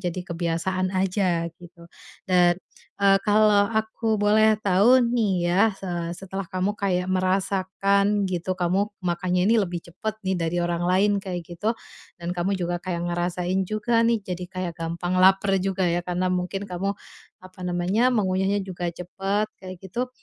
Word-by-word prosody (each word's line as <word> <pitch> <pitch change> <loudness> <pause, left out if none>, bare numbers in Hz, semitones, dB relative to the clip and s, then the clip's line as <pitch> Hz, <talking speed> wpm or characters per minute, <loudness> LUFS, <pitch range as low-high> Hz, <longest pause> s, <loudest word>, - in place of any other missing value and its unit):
jadi 180 -1 -3
kebiasaan 170 +2 -1
aja, 185 -3 +1
gitu. 175 -1 -14 0.4
Dan, 175 -1 +4 0.4
eee, 195 -1 +5
kalau 210 0 +4
aku 220 0 -1
boleh 215 +1 +4
tahu 205 +7 +5
nih, 220 -5 +2
ya. 180 +4 +3 0.2
Eee, 175 -2 -3
setelah 195 +1 -5
kamu 185 +3 -1
kayak 185 -3 0
merasakan, 195 +2 +1
gitu, 180 0 -2
kamu 185 +3 +1 0.2
makanya 180 +1 0
ini 230 +2 +4
lebih 175 -2 -3
cepet 200 +5 -5
nih, 190 - +1
dari 165 +2 -1
orang 175 0 -1
lain 190 +3 +3
kayak 180 -3 -4
gitu. 175 +6 -2 0.5
Dan 170 +1 -4
kamu 190 +3 0
juga 175 -1 -2
kayak 175 -2 -3
ngerasain 180 +2 -1
juga 215 +2 +1
nih, 230 -1 +3
jadi 180 -1 -4
kayak 185 -2 -4
gampang 170 +2 -2
laper 195 +1 +4
juga, 190 -1 0
ya, 170 +1 +1
karena 180 +1 -1
mungkin 185 +2 -2
kamu, 190 +3 -2 0.5
apa 185 0 -14
namanya, 180 +7 +1
mengunyahnya 195 -1 +1
juga 180 -2 -4
cepet, 195 +4 -2
kayak 185 -1 -8
gitu. 240 +7 -3
185 Hz, 155 wpm, -24 LUFS, 175-200 Hz, 0.5 s, eee